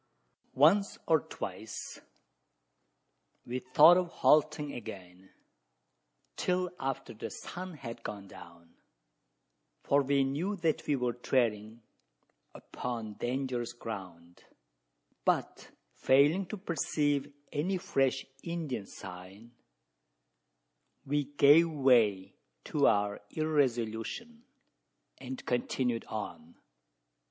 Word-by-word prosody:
Once 185 +9 +4
or 160 -1 +4
twice, 100 -4 -7 1.4
we 125 +1 -3
thought 155 +7 +7
of 180 -1 +1
halting 150 -1 +3
again 95 -4 -9 1.1
till 180 0 0
after 135 -2 -3
the 110 - -6
sun 180 0 -7
had 115 -5 -8
gone 100 -3 -7
down: 85 -2 -14 1.1
for 140 +1 +3
we 140 0 +2
knew 155 +10 -1
that 165 -5 -1
we 145 - +2
were 125 -2 -1
treading 115 -3 -1 0.7
upon 115 -4 -5
dangerous 125 +1 -3
ground; 90 -7 -9 0.8
but, - - -1 0.2
failing 150 +8 +3
to 215 - -5
perceive 145 -6 -1 0.2
any 180 +6 0
fresh 135 -8 0 0.2
Indian 155 - -4
sign, 95 +5 -11 1.5
we 145 +1 0
gave 145 +4 +6
way 120 -10 +3 0.3
to - - +2
our 100 0 +1
irresolution, 145 - -1 0.7
and 260 -2 -7
continued 125 -1 -1
on. 85 -6 -7
130 Hz, 90 wpm, -31 LUFS, 110-155 Hz, 1.5 s, thought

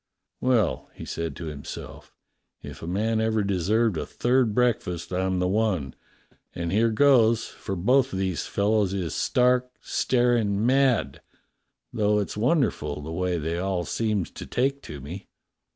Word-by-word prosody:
"Well," 120 -8 +1
he - - -8
said 85 0 -4
to 85 - -7
himself, 75 -3 -8 0.5
"if - - -9
a 80 - -6
man 110 +5 0
ever 110 -1 +1
deserved 100 +2 +1
a - - -2
third 120 -3 +1
breakfast, 95 -9 0
I'm 95 0 0
the 90 0 +1
one, 95 - 0 0.6
and 85 -1 -3
here 110 +4 +3
goes; 115 -2 +4
for 95 - -6
both 125 +9 +2
of 95 - -3
these 95 -3 -2
fellows 100 -1 +1
is 90 -5 -3
stark, 125 0 +2
staring 120 -4 +1
mad, 125 - +2 0.7
though 105 0 +2
it's 105 - -2
wonder 130 +7 +2
ful 75 0 -6
the 80 - -6
way 90 +1 -1
they 80 +2 -2
all 90 -2 -1
seems 105 -5 -1
to - - -9
take 135 +2 0
to 75 -2 -7
me." 85 +9 -8
105 Hz, 155 wpm, -25 LUFS, 90-120 Hz, 0.7 s, goes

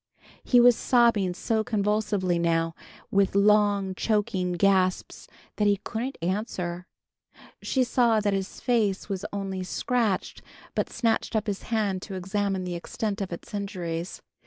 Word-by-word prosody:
He 245 - +4
was 245 0 +7
sobbing 225 -8 +3
so 220 +3 0
convulsively 205 -4 0
now, 165 -1 +1 0.4
with 195 -1 +2
long 205 -1 +3
choking 190 -3 0
gasps, 185 0 +1 0.3
that 210 - +2
he 200 -1 +3
couldn't 245 +4 -4
answer. 180 -2 -3 0.7
She 260 - +1
saw 240 -3 +3
that 205 -1 0
his 195 0 -3
face 215 -6 0
was 195 0 -3
only 195 -2 -3
scratched, 220 +1 -1 0.3
but - - -1
snatched 230 -1 0
up 220 0 +1
his 205 -3 -3
hand 205 -5 0
to 195 - -7
examine 195 +1 -1
the 180 -1 -4
extent 200 +4 -3
of 190 - -4
its 170 - -8
injuries. 180 -4 -4
200 Hz, 140 wpm, -26 LUFS, 185-220 Hz, 0.7 s, was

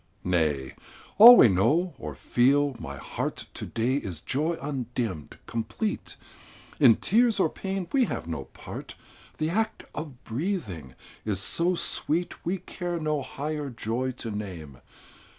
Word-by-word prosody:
Nay! 75 -7 0 0.5
all 240 +3 +12
we - - +9
know, 145 - +2
or - - -6
feel, 140 +3 +2
my 70 -7 -7
heart, - - -4
To - - -3
day 120 +4 0
is 95 - -5
joy 155 - -1
undimmed, 120 - -4
complete; 115 - -3 0.6
In 125 -7 +7
tears 230 +1 +3
or 160 - +3
pain 190 -2 -4
we 265 -3 +4
have - - -4
no 80 -5 -5
part; - - -9 0.4
The 155 +1 -1
act 220 +4 -1
of 145 -5 -7
breathing 110 - -4 0.3
is 105 -3 -1
so 170 - +1
sweet, 170 0 -1
We 180 +3 -1
care 175 -1 -5
no 155 -2 -1
higher 145 +2 -4
joy 120 +2 -2 0.2
to 115 - -3
name. 90 -10 -7
135 Hz, 140 wpm, -27 LUFS, 105-170 Hz, 0.6 s, all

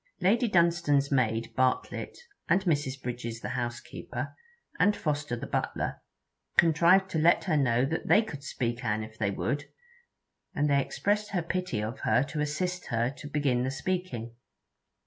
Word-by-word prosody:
Lady 230 +6 +3
Dunstane's 170 -6 +3
maid 115 -4 +1
Bartlett, 130 0 0 0.3
and 190 +3 +3
Mrs. 145 -6 0
Bridges 120 -2 -5
the - - -4
housekeeper, 120 -1 -5 0.4
and 205 +1 +4
Foster 145 -6 -2
the 115 - -6
butler, - - -2 0.6
contrived 175 +4 +5
to 160 - 0
let 165 +2 +4
her 170 -5 +1
know 125 -3 +3
that 160 +4 -3
they 220 - +6
could 145 -10 -8
speak 120 -3 -3
an 110 -2 0
if 110 0 -11
they 105 -2 +1
would; 145 +8 -2 0.9
and 145 +1 +2
they 140 -1 +3
expressed 210 +8 -1
their 175 -3 0
pity 175 -10 -2
of 115 +5 -4
her 125 - +3
to 150 +2 -4
assist 180 +5 -2
her 120 +2 0
to 145 +2 -10
begin 140 -4 +1
the 130 - 0
speaking. 135 -6 -3
145 Hz, 160 wpm, -29 LUFS, 120-170 Hz, 0.9 s, they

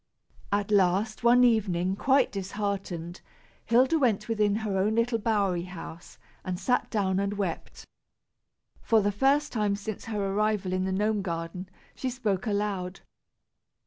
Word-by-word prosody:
At 205 +1 0
last, 200 +3 +2
one 245 +1 +6
evening, 190 -6 +2
quite 265 +4 +3
disheartened, 195 -3 -4 0.4
Hilda 260 +8 +3
went 240 -7 +1
within 210 -3 +1
her 200 -2 -1
own 200 +3 +1
little 230 0 +1
bowery 200 -5 0
house, 175 -2 -10 0.3
and 180 -1 -4
sat 250 +6 +2
her - - -31
down 190 -3 0
and 200 +1 -1
wept. 190 -5 -4 1.0
For 225 - +3
the 205 0 +1
first 275 +8 +2
time 210 -3 +1
since 205 +1 -6
her 205 -3 -2
arrival 210 -2 0
in 185 0 0
the 190 - -1
gnome 210 +2 +1
garden, 170 +1 -5 0.2
she 260 - -3
spoke 225 -5 -2
aloud. 200 -3 -2
205 Hz, 145 wpm, -27 LUFS, 190-220 Hz, 1.0 s, one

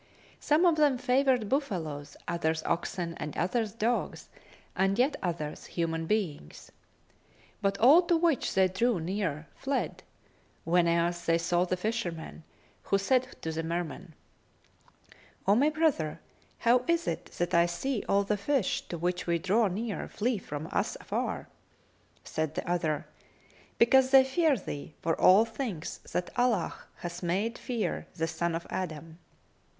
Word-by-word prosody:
Some 305 +4 +3
of 335 -3 +4
them 290 -4 +4
favoured 255 -2 +2
buffaloes[FN#264] 170 - -2
others 160 -2 -1
oxen 170 0 -2
and 150 - -5
others 215 +5 0
dogs 230 +3 -2 0.5
and 195 +2 +2
yet 260 +5 +3
others 165 -4 -4
human 165 -1 -2
beings; 165 - -3 0.9
but 195 0 +1
all 275 - +7
to 340 - +4
which 325 -5 +1
they 190 0 +5
drew 200 +3 +1
near 165 -3 -2
fled, 275 0 -2 0.6
whenas 170 0 +2
they 165 0 +4
saw 175 +1 +1
the 185 0 -1
fisherman, 180 -7 -4 0.4
who 195 - +1
said 255 +6 +1
to 160 - -2
the 160 +1 -2
Merman, 165 0 -4 1.3
"O 200 - +6
my 275 +8 +4
brother, 305 - 0 0.4
how 240 +1 +3
is 335 0 +1
it - - -2
that 175 0 -1
I 170 0 +5
see 220 +7 -2
all 200 0 +4
the 210 +1 0
fish, 245 +1 0
to 170 - -5
which 180 +2 -2
we 170 0 +2
draw 200 +6 +2
near, 210 +3 -3
flee 230 0 -1
from 150 -3 -6
us - - -1
afar?" - - -3 0.8
Said 155 -1 -3
the - - -4
other, 165 -3 0 0.7
"Because 260 +2 +5
they 265 0 +8
fear 285 +2 +2
thee, 150 -5 -7
for 165 - 0
all 195 +5 +7
things 225 - -5
that 180 - -2
Allah 235 -9 +2 0.2
hath 175 0 -6
made 195 +7 -1
fear 240 -4 -3
the 165 -2 0
son 170 0 -2
of 165 - -4
Adam. 165 -2 -5
190 Hz, 145 wpm, -29 LUFS, 170-245 Hz, 1.3 s, they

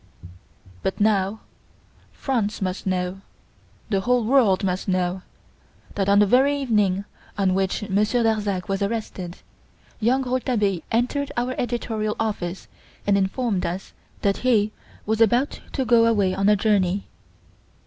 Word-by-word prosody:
"But 190 - -2
now, 205 0 +1 0.7
France 225 -6 -2
must 185 0 -3
know 185 0 -2 0.7
the 195 - +2
whole 245 +2 +2
world 220 -6 +3
must 185 +1 -1
know, 185 0 0 0.7
that, 195 -1 0
on 200 - +5
the 205 - +6
very 270 +7 +3
evening 205 -7 +1 0.3
on 190 -2 +2
which 195 +2 -1
Monsieur 215 +4 +1
Darzac 210 -4 0
was 195 0 -2
arrested, 200 -4 -3 0.6
young 250 +4 +2
Rouletabille 240 -8 0
entered 250 +5 0
our 245 +1 0
editorial 225 -3 -2
office 195 -5 -3 0.4
and 205 - +3
informed 200 +1 0
us 180 +3 -4 0.3
that 200 -1 +2
he 220 -4 +2 0.3
was 220 +1 0
about 240 +5 +2
to 265 - -1
go 230 -1 +5
away 200 -5 +2
on 195 +2 +2
a 210 - +6
journey. 200 -2 +1
210 Hz, 135 wpm, -23 LUFS, 190-235 Hz, 0.7 s, the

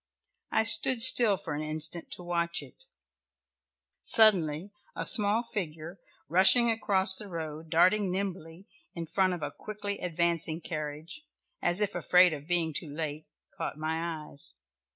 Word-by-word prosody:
I - - +1
stood 230 +3 +5
still 235 -5 +7
for 165 - -8
an 145 - -5
instant 155 +2 -5
to 180 - -8
watch 170 -2 -2
it; 130 - -17 1.2
suddenly 185 -5 +3 0.2
a - - -3
small 210 +2 +4
figure, 170 -6 -7 0.3
rushing 190 +8 +4
across 195 -4 +1
the 210 - -5
road, 160 -3 -8
darting 185 +4 +2
nimbly 185 -2 -6 0.3
in 170 -1 -6
front 185 +3 -1
of 170 -4 -7
a - - -5
quickly 205 -1 -8
advancing 170 -2 -2
carriage, 155 - -8 0.4
as 175 +4 0
if 205 - -1
afraid 180 -1 +3
of 145 0 -9
being 170 -2 -1
too 155 0 -4
late, 155 0 -6 0.3
caught - - -6
my 160 0 -5
eyes. 140 - -2
170 Hz, 145 wpm, -27 LUFS, 155-200 Hz, 1.2 s, still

